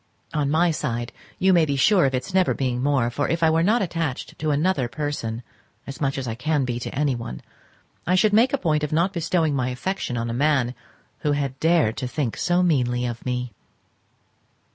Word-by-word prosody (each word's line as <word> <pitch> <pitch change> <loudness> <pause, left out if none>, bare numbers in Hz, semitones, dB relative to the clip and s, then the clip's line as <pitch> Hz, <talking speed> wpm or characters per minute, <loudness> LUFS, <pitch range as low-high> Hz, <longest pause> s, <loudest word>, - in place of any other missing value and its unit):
On 145 -2 0
my 165 +3 +3
side 120 -6 -3 0.3
you 190 0 +3
may 170 -2 +5
be 145 -2 0
sure 180 +5 +4
of 135 - -1
its 130 +9 -4
never 185 -1 +3
being 125 -2 -1
more, 130 -4 +1
for 145 +4 -1
if 165 0 0
I 160 - +5
were 160 +1 +2
not 210 +5 +3
attached 165 -7 -4
to 155 - -1
another 150 -2 +1
person 120 -3 -4 0.4
as 135 +1 -8
much 140 -1 0
as 130 -2 -3
I 115 - -2
can 145 +3 0
be 120 -1 -3
to - - -6
anyone, 125 - -2 0.6
I 180 - +3
should 205 +3 +3
make 235 +5 +5
a 280 - +1
point 155 - 0
of 150 - -2
not 170 +5 +1
bestowing 165 -3 0
my 130 -2 0
affection 125 0 -3
on 115 0 -2
a 115 - -3
man 135 -2 +1 0.5
who 150 - 0
had 140 -2 -2
dared 160 -9 +2
to 130 - -3
think 125 -3 -2
so 175 +1 +1
meanly 125 -7 +1
of 120 -1 -5
me. 125 -1 -2
145 Hz, 210 wpm, -23 LUFS, 125-165 Hz, 0.6 s, may